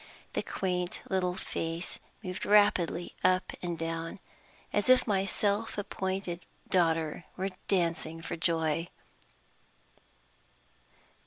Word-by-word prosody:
The - - +1
quaint 180 -2 -2
little 180 -1 +1
face 165 -1 -3 0.2
moved 185 -1 -4
rapidly 200 -4 +4
up 185 0 +3
and 175 -2 -2
down, 165 +1 -3 0.6
as 205 +4 +2
if 255 0 +7
my 195 -3 +2
self 205 +3 0
appointed 190 -3 -2 0.2
daughter 165 -3 +2
were 190 +1 0 0.2
dancing 165 -3 +1
for 165 - -4
joy! 165 -1 +1
180 Hz, 100 wpm, -31 LUFS, 165-195 Hz, 0.6 s, if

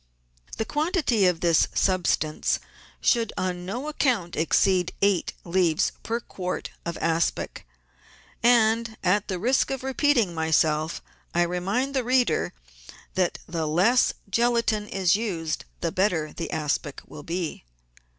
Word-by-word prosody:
The 220 - -1
quantity 295 - +1
of 175 -2 0
this 170 -2 +4
substance 175 -5 +1 0.4
should 230 -3 +2
on 180 -1 -2
no 245 +9 -4
account 245 - 0
exceed 180 +3 +2
eight 200 -3 +2
leaves 170 -3 +2
per 230 +1 -2
quart 185 -5 -5 0.2
of 170 - -3
aspic, 165 - -1 0.7
and, 230 -1 +3
at 200 +3 +2
the 185 - -2
risk 250 +9 +2
of 270 -1 -3
repeating 265 -7 +2
myself, 160 -1 +1 0.3
I 175 - +4
remind 195 +10 -1
the 260 -2 +1
reader 250 0 +2 0.6
that 185 -2 0
the 165 -2 -2
less 190 +11 +3
gelatine 230 0 +1
is 190 -3 +2
used 175 -8 -3 0.2
the 165 - -1
better 175 -5 0
the 165 - -5
aspic 150 -3 -2
will 150 - -10
be. 165 - -4
185 Hz, 130 wpm, -25 LUFS, 170-235 Hz, 0.7 s, this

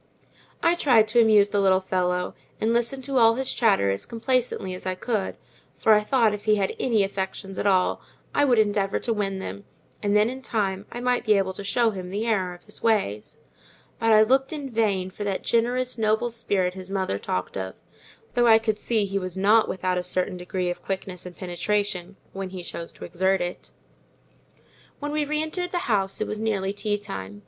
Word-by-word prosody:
I 335 - +5
tried 245 -10 +4
to 235 +2 +5
amuse 210 -2 +5
the 205 - 0
little 190 -1 +4
fellow, 180 -1 -1 0.3
and 225 +1 +1
listened 240 +3 0
to 275 0 -1
all 225 -1 +6
his 265 +1 -2
chatter 195 - +3
as 100 - -4
complacently 235 -5 -1
as 185 - -7
I 185 - -1
could; 210 0 -2 0.4
for 220 - +4
I 210 0 +4
thought 225 -2 +3
if 210 - -6
he 215 -1 +4
had 195 -2 -1
any 225 -5 +2
affections 195 0 -4
at - - 0
all, 185 -2 +2 0.3
I 290 - +3
would 255 -4 +4
endeavour 205 -2 +2
to 235 - -1
win 195 -2 -2
them; 200 +1 -6 0.4
and 205 0 +1
then, 210 +1 +4
in 260 +2 -5
time, 200 -5 -2
I 240 - -6
might 250 0 +1
be 215 -3 +4
able 190 -1 0
to 200 - -7
show 225 +3 +2
him 185 -3 -6
the 205 +4 -2
error 190 -6 0
of 175 - -18
his 210 - -11
ways: 200 - 0 0.6
but 225 0 +2
I 215 0 +7
looked 265 +4 +2
in 285 -4 -5
vain 200 -5 0
for 205 - -6
that 200 -2 -2
generous, 245 +1 0
noble 220 +2 +1
spirit 195 -5 0
his 190 0 -9
mother 190 - -1
talked 90 -1 -3
of; 95 -1 -4 0.6
though 240 0 +3
I 220 -1 +8
could 220 -2 -1
see 220 -3 +1
he 195 0 -2
was 185 -1 -5
not 210 +3 +4
without 185 -1 -1
a - - -3
certain 185 +1 -1
degree 180 0 -2
of 175 - -7
quickness 190 -2 -5
and 180 - -11
penetration, 195 0 -2 0.2
when 195 -1 -4
he 185 -1 -7
chose 170 0 -6
to - - -9
exert 190 +1 +1
it. 175 0 -5 1.3
When 290 0 -4
we 300 0 0
re 300 +1 -1
entered 355 +3 -3
the 360 - -1
house 195 -4 0
it 215 - -1
was 215 0 -4
nearly 200 -3 0
tea 205 0 -1
time. 100 - -7
205 Hz, 210 wpm, -25 LUFS, 185-230 Hz, 1.3 s, I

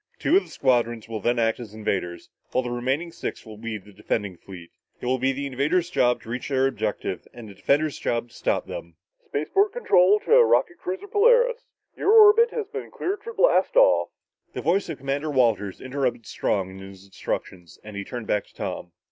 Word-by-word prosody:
Two - - +2
of 390 - +6
the - - -17
squadrons 120 -4 0
will 110 -1 -4
then 120 +4 0
act 115 0 +1
as 110 -3 -9
invaders 95 -5 -3 0.2
while 130 - +1
the 120 - -4
remaining 135 +8 -2
six - - -6
will 110 -1 -10
be 115 -1 -4
the 105 0 -16
defending 100 -1 -3
fleet. 90 -1 -12 0.3
It - - -8
will 130 +1 +1
be 135 +2 +2
the 140 +1 -4
invaders' 150 +7 0
job 125 -8 +2
to 115 - -12
reach 120 +3 -4
their 135 -1 +2
objective 135 - -3
and 120 -2 -10
the 100 - -11
defenders' 145 +8 0
job 120 0 -2
to - - -22
stop - - -1
them." 85 -1 -8 0.3
"Spaceport 390 - +1
control 205 - +4
to 480 +1 +6
rocket 355 -5 +2
cruiser 380 +2 -5
Polaris, 485 +3 +3 0.3
your 410 - +2
orbit 450 +2 +7
has 455 -3 -3
been - - -6
cleared 395 +2 -3
for 465 - -7
blast - - +3
off...." - - +5 0.4
The - - -4
voice 185 +2 +1
of 160 - -4
Commander 140 +3 -3
Walters 115 -8 +1
interrupted 130 -3 -2
Strong 95 -2 -1
in 95 - -11
his 95 0 -12
instructions 90 -3 -6
and 105 -1 -10
he 100 - -4
turned 120 +2 -7
back 105 -1 0
to - - -25
Tom. 85 - -5
130 Hz, 205 wpm, -24 LUFS, -, 0.4 s, orbit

